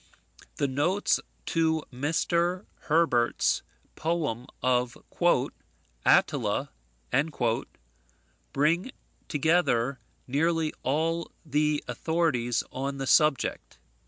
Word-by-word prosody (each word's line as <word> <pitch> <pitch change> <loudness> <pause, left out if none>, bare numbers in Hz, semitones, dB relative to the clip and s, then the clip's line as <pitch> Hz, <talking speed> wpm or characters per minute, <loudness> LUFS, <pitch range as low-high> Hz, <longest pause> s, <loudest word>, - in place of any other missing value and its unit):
The 140 - 0
notes 160 +10 +1 0.3
to 160 -1 +1
Mr. 170 +6 0 0.2
Herbert's 150 -7 +2 0.3
poem 150 -8 -2 0.2
of 125 -1 +1 1.1
"Attila" - - +2 1.8
bring 165 - +1 0.4
together 140 -5 +2 0.3
nearly 160 +3 +1
all 165 +5 0
the 150 0 +1
authorities 155 -8 0
on 135 +1 -3
the 135 - -3
subject. 150 - +2
150 Hz, 70 wpm, -28 LUFS, 130-165 Hz, 1.8 s, Herbert's